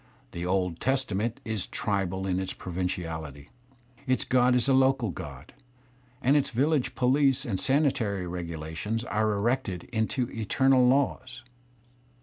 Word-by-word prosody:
The 85 +1 -4
Old 90 -2 0
Testament 120 -4 0
is 110 -4 -1
tribal 95 -2 -2
in 95 -1 0
its 95 - -4
provinciality; 80 -5 -4 0.6
its 130 0 +2
god 125 0 +3
is 125 +1 +2
a 135 - +4
local 130 -5 +3
god, 70 -2 -9 0.7
and 135 +4 +4
its 145 - +2
village 140 +3 +1
police 135 +1 +3
and 100 -6 -2
sanitary 120 -9 +1
regulations 85 +5 -4
are 110 -3 0
CTected 105 -3 -1
into 120 +2 0
eternal 125 +3 +3
laws. 130 -1 0
110 Hz, 130 wpm, -27 LUFS, 90-130 Hz, 0.7 s, a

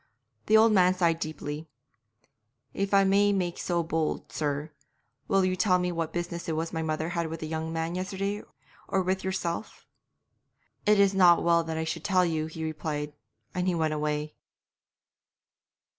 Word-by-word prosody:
The 220 - +6
old 225 +1 +6
man 185 -2 +4
sighed 170 -3 +2
deeply. 155 -1 -5 1.1
'If 195 0 -2
I 200 -1 +5
may 200 +1 +4
make 180 -3 -1
so 175 -1 0
bold, 160 -1 -2
sir, 150 0 -2 0.6
will 195 -1 +3
you 185 0 +1
tell 185 -1 +3
me 180 0 -1
what 165 -2 -2
business 170 0 -4
it 160 - -1
was 165 +2 -3
my 160 - -1
mother 160 0 -2
had 170 -1 -1
with 165 0 -6
the 155 - -3
young 160 0 -3
man 165 +1 -2
yesterday 195 +2 -3 0.5
or 190 -1 +1
with 190 +1 -1
yourself?' 190 0 -3 1.0
'It 210 -1 +5
is 200 -1 +5
not 180 -3 +6
well 170 0 +4
that 160 0 -3
I 160 - -1
should 160 - -4
tell 185 -3 +3
you,' 160 -2 -1
he 160 0 -7
replied, 150 -1 -3 0.4
and 180 0 -1
he 180 - +2
went 160 -2 0
away. 150 0 -2
170 Hz, 175 wpm, -28 LUFS, 160-190 Hz, 1.1 s, The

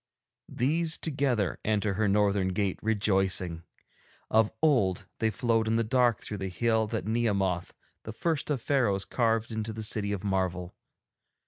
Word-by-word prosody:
These, 160 +6 0
together, 135 - -1
enter 105 -1 0
her 105 +2 +1
northern 100 -1 +2
gate 100 -1 -1
rejoicing. 95 -5 +1 0.7
Of 110 0 +4
old 120 - +2
they 110 - +2
flowed 115 +1 0
in 110 - +1
the 115 - +2
dark 120 -1 +2
through 105 - -6
the 95 0 -3
Hill 110 +3 +1
that 110 0 -3
Nehemoth, 100 -6 0 0.3
the 110 - -7
first 155 +7 -2
of 135 -6 -1
Pharaohs, 110 -9 +1
carved 115 -2 0
into 110 0 -3
the 110 0 -5
City 105 -1 -1
of 100 -3 -3
Marvel. 95 -2 -1
110 Hz, 150 wpm, -28 LUFS, 95-115 Hz, 0.7 s, Of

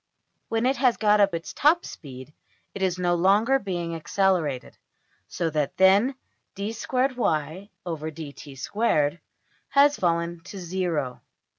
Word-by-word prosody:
When 225 +1 0
it 265 +2 +2
has 250 -1 +3
got 210 -1 +3
up 200 -3 +3
its 165 - -6
top 325 +5 +3
speed 130 -1 -10 0.4
it 200 - -7
is 185 -1 +1
no 175 -1 +1
longer 205 +9 +3
being 175 -5 -3
accelerated, 165 -5 0 0.5
so 165 -2 -2
that 150 -2 -1
then 200 +8 +5 0.4
$\dfrac{d^2y}{dt^2}$ 165 - -2 0.5
has 285 +1 +5
fallen 170 -1 0
to 200 - -9
zero. 170 -8 -2
185 Hz, 115 wpm, -25 LUFS, 160-215 Hz, 0.5 s, then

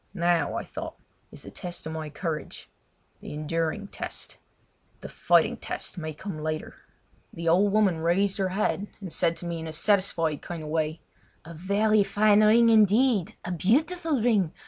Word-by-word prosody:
Now, 170 -3 +1
I - - -2
thought, - - -7 0.4
is - - -12
the - - -10
test 175 -1 -7
of 160 - -5
my 155 -1 -5
courage—the 155 -1 -8
enduring 165 +6 -2
test: - - -7 0.6
the - - -7
fighting - - +2
test - - -5
may 155 -3 -5
come 155 +1 -7
later! 155 0 -4 0.6
The 170 0 -6
old 190 +5 +4
woman 200 -5 +2
raised 190 +5 +1
her 190 -1 +1
head 200 +1 -1
and 190 -5 -7
said 165 - +1
to - - -7
me 170 -1 -3
in 160 - -6
a - - -5
satisfied 165 -4 +1
kind 170 -2 -6
of 150 - -7
way: 155 0 -1 0.4
"A 170 - -9
very 200 +5 +2
fine 210 +1 +4
ring, 230 +2 +6
indeed—a 215 -4 +3
beautiful 290 - +1
ring! 205 -9 +2
180 Hz, 165 wpm, -26 LUFS, 160-210 Hz, 0.6 s, ring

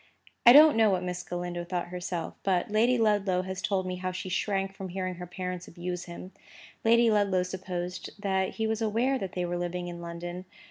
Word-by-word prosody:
I - - +13
don't 300 +3 +9
know 220 -1 +5
what 185 -2 +1
Miss 180 0 -3
Galindo 175 0 -4
thought 175 0 -3
herself; 180 -1 -4
but 190 +1 0
Lady 235 +4 +3
Ludlow 205 -5 +2
has 190 +1 -5
told 190 -2 0
me 185 0 -3
how 185 0 -3
she 185 +1 -5
shrank 195 +1 -1
from 195 -1 -7
hearing 185 0 -3
her 180 0 -8
parents 180 0 -5
abuse 175 +1 -5
him. 180 +2 -9 0.5
Lady 230 0 +5
Ludlow 200 -3 +2
supposed 180 -1 -5
that 190 -2 0
he 220 - -1
was 220 +1 -1
aware 235 +5 +1
that 195 -4 -5
they 180 -1 -1
were 175 0 -2
living 175 0 -3
in 170 0 -7
London. 175 +2 -6
185 Hz, 200 wpm, -28 LUFS, 180-205 Hz, 0.5 s, I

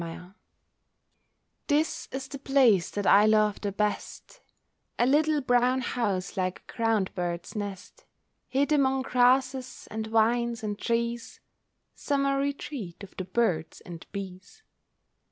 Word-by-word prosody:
MY 165 -1 -6
HOME 180 +2 -13 1.3
This 305 +1 0
is 265 0 -5
the 275 0 -8
place 255 -10 +3
that 205 -1 -4
I 205 +2 +6
love 215 -1 +3
the 205 - -2
best, 210 - -3 0.6
A 240 - +3
little 300 +3 +3
brown 250 0 +2
house 200 -8 -2
like 185 -2 -2
a - - -10
ground 225 -5 0
bird's 175 +1 -4
nest, 205 - -7 0.4
Hid 280 +3 0
among 270 -3 +2
grasses, 255 +1 +1
and 220 0 -4
vines, 230 +1 +1
and 210 -1 -3
trees, 235 +1 -2 0.5
Summer 275 -1 0
retreat 275 - -4
of 200 - -12
the 185 - -4
birds 180 -7 -1
and 170 -2 -10
bees. 195 - -8
230 Hz, 135 wpm, -27 LUFS, 200-265 Hz, 1.3 s, I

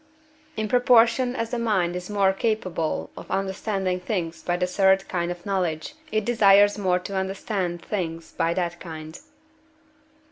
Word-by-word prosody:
In 215 - -1
proportion 245 +1 +4
as 230 -3 -3
the 245 - -1
mind 190 -7 +1
is 180 +1 -6
more 200 -2 +3
capable 190 -7 -2
of - - -10
understanding 190 -1 -1
things 180 -4 -3
by 175 0 -1
the 180 - +1
third 190 +1 +3
kind 175 -1 -2
of 175 0 -6
knowledge, 180 - -2 0.2
it 215 -1 0
desires 205 -3 +5
more 185 -3 +1
to 190 +2 -6
understand 190 -2 -2
things 165 -5 -4
by 170 +1 0
that 175 -1 -2
kind. 160 -2 -8
190 Hz, 150 wpm, -24 LUFS, 175-210 Hz, 0.2 s, desires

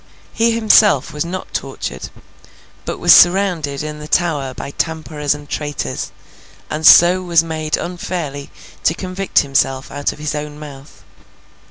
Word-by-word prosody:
He 230 +1 +2
himself 215 - +3
was 150 - -2
not 180 +2 -7
tortured, 100 - -5 0.8
but - - -4
was - - +6
surrounded 175 -6 +3
in 150 0 -6
the 150 - -9
Tower 150 -7 0
by 140 - -7
tamperers 155 -2 -2
and 145 0 -12
traitors, 145 -1 -4 0.6
and 155 +1 +1
so 180 +2 +7
was 170 -2 +2
made 155 -1 -2
unfairly 170 -5 -5 0.3
to 165 - +2
convict 185 +1 0
himself 135 -1 -1
out 145 +1 -2
of - - -12
his 150 0 -4
own 150 0 -6
mouth. 145 -2 -12
155 Hz, 145 wpm, -17 LUFS, 145-175 Hz, 0.8 s, so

